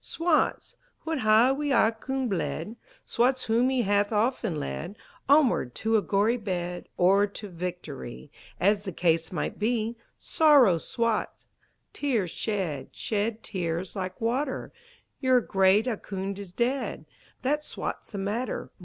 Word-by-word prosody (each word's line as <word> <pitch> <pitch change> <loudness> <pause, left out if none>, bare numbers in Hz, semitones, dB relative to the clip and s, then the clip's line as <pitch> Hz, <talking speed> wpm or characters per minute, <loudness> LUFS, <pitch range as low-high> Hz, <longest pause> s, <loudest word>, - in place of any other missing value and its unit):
Swats 330 -1 0 0.3
wha 325 0 -1
hae 225 +1 +5
wi' 290 +1 -1
Ahkoond 250 +3 +1
bled, 210 +2 -3 0.3
Swats 255 +2 +1
whom 235 +3 +2
he 260 -2 +1
hath 205 +1 +2
often 220 - 0
led 70 - -5 0.3
Onward 270 - +4
to 225 0 0
a 215 - +4
gory 210 +5 +2
bed, 180 -5 -4
Or 195 +3 +4
to 205 +1 -8
victory, 165 -6 -7 0.3
As 200 +2 +3
the 190 -3 -5
case 165 -1 +1
might 180 - -3
be, 225 +1 0 0.2
Sorrow 275 - +5
Swats! 230 +4 -2 0.4
Tears 230 - 0
shed, 185 -11 -3
Shed 215 +1 -2
tears 175 0 -3
like 185 -1 -4
water, 260 +4 -2 0.5
Your 260 -2 +4
great 195 0 +3
Ahkoond 200 -4 -4
is 200 -3 -8
dead! 245 +7 -1 0.4
That 295 +3 +1
Swats - - -5
the - - -4
matter! 210 +6 -3
215 Hz, 135 wpm, -27 LUFS, 190-245 Hz, 0.5 s, hae